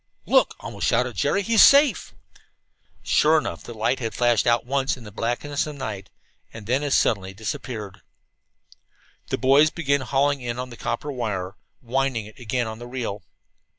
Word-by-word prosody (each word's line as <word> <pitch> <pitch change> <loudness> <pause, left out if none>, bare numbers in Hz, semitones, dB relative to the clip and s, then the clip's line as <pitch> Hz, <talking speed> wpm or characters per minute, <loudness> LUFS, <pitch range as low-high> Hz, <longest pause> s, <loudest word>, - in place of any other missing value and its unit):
"Look!" - - +3
almost - - -4
shouted - - +1
Jerry. 200 - +1
"He's 225 +1 +4
safe!" 280 0 +5 0.9
Sure 155 +1 +4
enough, - - -3
the 120 - -9
light 110 +4 0
had 115 -3 -4
flashed 120 -2 +2
out 120 0 +2
once 135 +1 0
in 125 - -12
the 105 - -10
blackness 120 +8 -2
of 150 - -7
the - - -12
night, 105 -7 -6 0.4
and 115 -2 -10
then 130 +5 +1
as 145 -2 +1
suddenly 95 -3 0
disappeared. 105 -1 -6 1.3
The - - -2
boys 135 +5 +5
began 140 -4 0
hauling 140 +2 +1
in 120 -1 -4
on 125 0 -5
the - - -9
copper 120 +6 -4
wire, 105 -7 -3 0.3
winding 130 -2 -1
it 110 - -14
again 120 +1 -2
on 110 0 -7
the 120 - -8
reel. 120 -5 -4
120 Hz, 175 wpm, -24 LUFS, 110-140 Hz, 1.3 s, safe